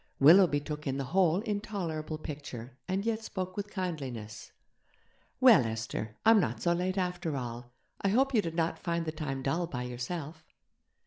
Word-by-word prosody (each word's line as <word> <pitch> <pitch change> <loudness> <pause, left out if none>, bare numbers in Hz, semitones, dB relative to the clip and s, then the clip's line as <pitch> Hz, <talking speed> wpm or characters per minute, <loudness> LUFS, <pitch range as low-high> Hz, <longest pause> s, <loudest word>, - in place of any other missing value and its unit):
Willoughby 160 +1 +7
took 150 0 -6
in 135 0 -1
the 140 - -1
whole 185 -1 +4
intolerable 195 -8 -3
picture, 135 -5 -7
and 190 +2 -1
yet 225 -1 0
spoke 185 -3 -4
with 205 0 -4
kindliness. 135 - -5 0.9
'Well, 240 - +8
Esther! 110 -1 -4
I'm 225 -1 +7
not - - -1
so 170 - +2
late, 185 +2 -1
after 180 -5 -1
all. 120 -1 -6 0.3
I 195 - +2
hope 265 +6 +3
you 220 - +4
did 165 -3 -5
not 165 0 0
find 170 -1 -1
the 155 - -2
time 135 -4 -4
dull 165 +6 0
by 125 -6 -4
yourself?' 150 +6 -5
165 Hz, 170 wpm, -30 LUFS, 135-190 Hz, 0.9 s, Well